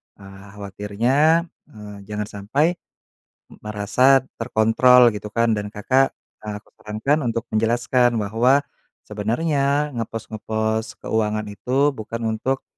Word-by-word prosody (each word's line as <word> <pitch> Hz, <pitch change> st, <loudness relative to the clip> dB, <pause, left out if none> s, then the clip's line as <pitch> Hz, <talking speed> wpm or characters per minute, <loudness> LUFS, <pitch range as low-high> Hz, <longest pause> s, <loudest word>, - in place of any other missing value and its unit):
Eee, 95 Hz, 0 st, -14 dB
khawatirnya, 115 Hz, -, +1 dB, 0.2 s
eee, 105 Hz, -2 st, -11 dB
jangan 105 Hz, -1 st, -4 dB
sampai 140 Hz, -, -1 dB, 0.7 s
m -, -, -14 dB
merasa 115 Hz, +6 st, +3 dB, 0.2 s
terkontrol 120 Hz, +1 st, +5 dB
gitu 105 Hz, 0 st, -7 dB
kan. 115 Hz, +1 st, +1 dB
Dan, 105 Hz, -1 st, -3 dB
Kakak, 130 Hz, +6 st, +1 dB, 0.2 s
aku 105 Hz, 0 st, -8 dB
sarankan 110 Hz, +9 st, -1 dB
untuk 115 Hz, 0 st, -2 dB
menjelaskan 120 Hz, +2 st, +2 dB
bahwa 115 Hz, +7 st, +2 dB, 0.4 s
sebenernya 140 Hz, +7 st, 0 dB
ngepos-ngepos 110 Hz, -1 st, -3 dB
keuangan 110 Hz, -1 st, -1 dB
itu 130 Hz, +7 st, 0 dB
bukan 115 Hz, -1 st, -6 dB
untuk 130 Hz, +4 st, -2 dB
115 Hz, 110 wpm, -22 LUFS, 105-130 Hz, 0.7 s, terkontrol